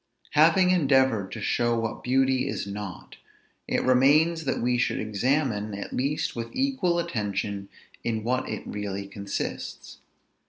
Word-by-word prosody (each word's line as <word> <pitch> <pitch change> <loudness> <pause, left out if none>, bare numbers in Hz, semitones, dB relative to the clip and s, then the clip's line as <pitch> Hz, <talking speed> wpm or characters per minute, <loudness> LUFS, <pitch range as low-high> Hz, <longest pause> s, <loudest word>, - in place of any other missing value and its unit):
Having 165 +5 +5
endeavored 130 - +3
to 110 - -6
show 120 +3 +1
what 115 -1 -3
beauty 130 0 +2
is - - -3
not, 100 -2 -7 0.5
it - - 0
remains 150 +6 +4
that - - 0
we 125 +1 +1
should - - +1
examine, 110 -1 0
at 100 - -6
least 140 +4 -1
with 115 -1 -4
equal 260 -11 +1
attention, 100 - -2 0.3
in 110 -2 -1
what 125 +3 -1
it 110 - -5
really 100 -1 -4
consists. 100 0 -5
125 Hz, 135 wpm, -26 LUFS, 105-140 Hz, 0.5 s, Having